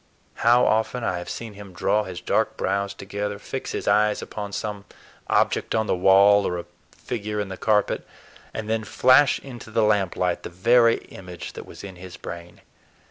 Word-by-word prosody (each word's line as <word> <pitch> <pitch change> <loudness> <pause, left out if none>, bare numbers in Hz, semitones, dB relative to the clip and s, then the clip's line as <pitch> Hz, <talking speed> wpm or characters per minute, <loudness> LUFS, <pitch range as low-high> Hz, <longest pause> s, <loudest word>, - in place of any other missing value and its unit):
How 120 +2 +5
often 110 +3 +1
I 90 -5 -1
have 90 - -7
seen 115 -2 -6
him 100 -2 -11
draw 105 +3 +1
his 90 -2 -7
dark - - 0
brows 100 +1 -1
together, 100 +1 -4
fix - - -6
his - - -4
eyes 105 0 +3
upon 105 -1 -6
some 100 0 -4 0.4
object - - +1
on 110 0 +1
the - - +1
wall 100 +2 +5
or 90 - -2
a 85 - -6 0.3
figure 105 -3 -4
in 100 -2 -3
the 95 - -5
carpet, 105 +1 +1 0.5
and 110 -1 -5
then 110 0 0
flash 130 +6 +4
into 120 -4 -10
the 110 0 +1
lamplight 95 -4 +1
the - - -7
very 115 +6 +4 0.2
image 90 -2 -8
that - - -9
was - - -11
in 95 -2 -9
his 90 0 -10
brain. 85 0 -9
105 Hz, 185 wpm, -24 LUFS, 95-110 Hz, 0.5 s, How